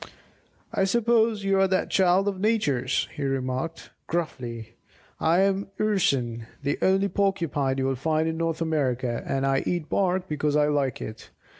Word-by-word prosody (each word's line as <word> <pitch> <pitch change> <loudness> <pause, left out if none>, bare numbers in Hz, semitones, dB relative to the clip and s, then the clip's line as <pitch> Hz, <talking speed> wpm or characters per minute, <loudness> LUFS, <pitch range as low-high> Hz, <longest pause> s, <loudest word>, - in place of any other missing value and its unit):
"I 195 - +2
suppose 225 0 +2
you 195 0 +2
are 195 - +4
that 185 0 0
child 190 +1 +3
of 195 -2 -1
Nature's," 150 - +1
he - - -7
remarked, 135 +3 -3 0.2
gruffly, 120 -9 -4 0.5
"I 165 +3 +3
am 195 0 +1
the - - -1
Urson, 125 - 0 0.2
the 145 0 -1
only 195 +1 +3
Porcupine 170 -10 0
you'll 135 0 +1
find 155 +4 0
in 160 - -1
North 165 0 -1
America, 130 -7 -1
and 135 0 0
I 135 0 +2
eat 175 -3 -2
bark 185 -1 +1
because 150 -2 -1
I 150 0 +3
like 140 -4 0
it. 110 +1 -9
160 Hz, 160 wpm, -26 LUFS, 135-190 Hz, 0.5 s, are